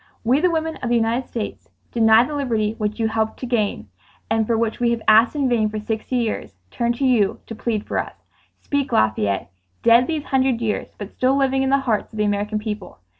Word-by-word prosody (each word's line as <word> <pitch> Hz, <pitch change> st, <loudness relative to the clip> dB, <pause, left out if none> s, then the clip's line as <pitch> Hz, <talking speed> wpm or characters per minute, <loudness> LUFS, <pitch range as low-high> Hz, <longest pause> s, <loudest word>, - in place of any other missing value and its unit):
"We, 250 Hz, +5 st, +3 dB
the 360 Hz, +3 st, +3 dB
women 320 Hz, -1 st, -2 dB
of 245 Hz, -, -4 dB
the 240 Hz, -, +2 dB
United 230 Hz, +2 st, 0 dB
States, 225 Hz, -3 st, -6 dB, 0.2 s
denied 225 Hz, +1 st, +5 dB
the 300 Hz, -, -6 dB
liberty 225 Hz, -7 st, 0 dB
which 210 Hz, +1 st, -2 dB
you 225 Hz, -, +2 dB
helped 220 Hz, 0 st, -1 dB
to -, -, -3 dB
gain, 215 Hz, -, -1 dB, 0.4 s
and 225 Hz, -1 st, +1 dB
for 230 Hz, -, +1 dB
which 225 Hz, -1 st, -1 dB
we 240 Hz, -1 st, +2 dB
have 235 Hz, -1 st, -1 dB
asked 220 Hz, +6 st, +5 dB
in 280 Hz, -2 st, +1 dB
vain 225 Hz, -4 st, +2 dB
for 215 Hz, -, -5 dB
sixty 220 Hz, +3 st, -3 dB
years, 220 Hz, -, -2 dB
turn 235 Hz, -, 0 dB
to 270 Hz, +3 st, -2 dB
you 230 Hz, -6 st, +2 dB
to -, -, -7 dB
plead 220 Hz, -1 st, -2 dB
for -, -, -2 dB
us. -, -, -6 dB, 0.4 s
"Speak, 285 Hz, -2 st, -2 dB
Lafayette, 105 Hz, -, +1 dB, 0.3 s
dead 235 Hz, +2 st, +5 dB
these 315 Hz, -3 st, -2 dB
hundred 265 Hz, -4 st, +1 dB
years 220 Hz, -2 st, -2 dB
but 205 Hz, 0 st, -7 dB
still 260 Hz, +1 st, +1 dB
living 270 Hz, -1 st, +2 dB
in 265 Hz, -, +1 dB
the 275 Hz, 0 st, +3 dB
hearts 220 Hz, -2 st, -1 dB
of -, -, -8 dB
the 210 Hz, -, +1 dB
American 205 Hz, +1 st, -1 dB
people. 210 Hz, -, -6 dB
230 Hz, 225 wpm, -21 LUFS, 215-255 Hz, 0.4 s, denied